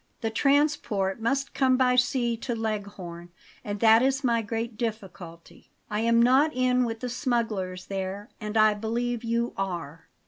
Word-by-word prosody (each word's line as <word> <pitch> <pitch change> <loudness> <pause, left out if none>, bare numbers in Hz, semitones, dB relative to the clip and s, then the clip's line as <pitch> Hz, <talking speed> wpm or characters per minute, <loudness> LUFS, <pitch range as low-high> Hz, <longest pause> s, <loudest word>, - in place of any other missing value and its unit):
The 225 -2 -1
transport 255 -7 +1
must 275 +4 -1
come 260 -2 +3
by 250 -1 +3
sea 250 -1 +1
to 235 +1 -4
Leghorn, 200 -6 -5 0.3
and 205 0 -4
that 225 0 +6
is 270 +1 +1
my 235 -2 +2
great 225 +1 -4
difficulty; 195 -7 -7 0.2
I 210 - -1
am 230 +1 +3
not 260 +6 +4
in 255 0 +2
with 225 -1 -5
the 250 - -3
smugglers 220 -8 -2
there, 195 +1 -5
and 210 +1 -3
I 215 0 +5
believe 235 +3 -2
you 235 +1 -1
are." 170 -5 -5
225 Hz, 160 wpm, -26 LUFS, 205-250 Hz, 0.3 s, that